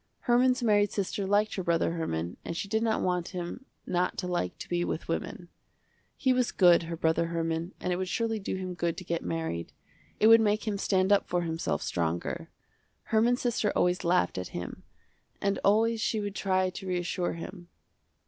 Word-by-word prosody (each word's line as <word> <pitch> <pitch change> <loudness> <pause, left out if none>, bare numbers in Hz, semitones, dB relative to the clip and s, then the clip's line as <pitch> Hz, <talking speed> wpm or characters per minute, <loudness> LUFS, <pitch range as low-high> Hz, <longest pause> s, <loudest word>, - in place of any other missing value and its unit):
Herman's 250 +1 +3
married 205 -3 +3
sister 200 0 -2
liked 205 +2 +2
her 190 - -3
brother 170 -1 +1
Herman, 90 - -3
and 170 - -5
she 200 - -3
did 220 +2 0
not 225 -1 +1
want 180 -2 0
him 175 +9 -5 0.2
not 180 0 0
to 180 - -2
like 175 - -2
to - - -8
be 175 0 0
with 165 - -3
women. 175 +1 -4 0.7
He 260 -2 +3
was 250 -1 +1
good, 175 -3 +6
her 165 0 -5
brother 160 +1 +1
Herman, 165 +1 -2
and 180 - -1
it - - -1
would 185 0 -2
surely 225 +3 -1
do 195 - -3
him 185 -1 -4
good 170 -1 -2
to 185 - -6
get 170 -1 -2
married. 160 - -3 0.5
It - - +4
would 225 0 +8
make 215 +1 +1
him 205 -2 -1
stand 190 -1 +2
up 200 - +4
for 175 0 0
himself 165 0 -2
stronger. 85 0 -2 0.6
Herman's 235 +3 +3
sister 230 -4 +1
always 180 +1 +2
laughed 170 - +2
at 90 - -4
him 90 - -6 0.6
and 200 0 0
always 225 +2 +3
she 220 - 0
would 205 -1 -3
try 185 -2 +1
to 190 +1 -8
reassure 180 0 -1
him. 175 +1 -8
185 Hz, 195 wpm, -29 LUFS, 170-210 Hz, 0.7 s, would